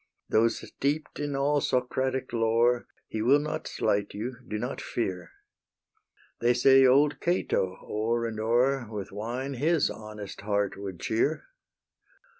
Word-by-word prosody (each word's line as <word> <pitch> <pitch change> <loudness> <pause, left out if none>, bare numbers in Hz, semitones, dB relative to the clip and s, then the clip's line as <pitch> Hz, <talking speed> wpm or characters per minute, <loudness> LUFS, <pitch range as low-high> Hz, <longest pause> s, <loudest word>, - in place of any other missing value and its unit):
Though 110 +1 +4
steep'd 145 +6 -3
in 145 -1 -2
all 145 +1 +2
Socratic 130 +1 -1
lore 115 +1 +2 0.2
He 110 - -3
will 130 +6 +5
not 150 +1 -3
slight 100 -2 -1
you; 120 +5 -4
do 105 - -3
not 125 +5 -4
fear. 95 -6 -3 1.1
They 120 +1 +3
say 135 +1 +6
old 145 +3 +4
Cato 95 - 0
o'er 115 +2 -1
and 110 -1 -4
o'er 120 +3 +2
With 105 -3 -6
wine 120 +7 -4
his 155 +4 +2
honest 105 -2 -8
heart 100 -1 0
would 95 -3 -7
cheer. 130 - 0
120 Hz, 135 wpm, -28 LUFS, 110-135 Hz, 1.1 s, say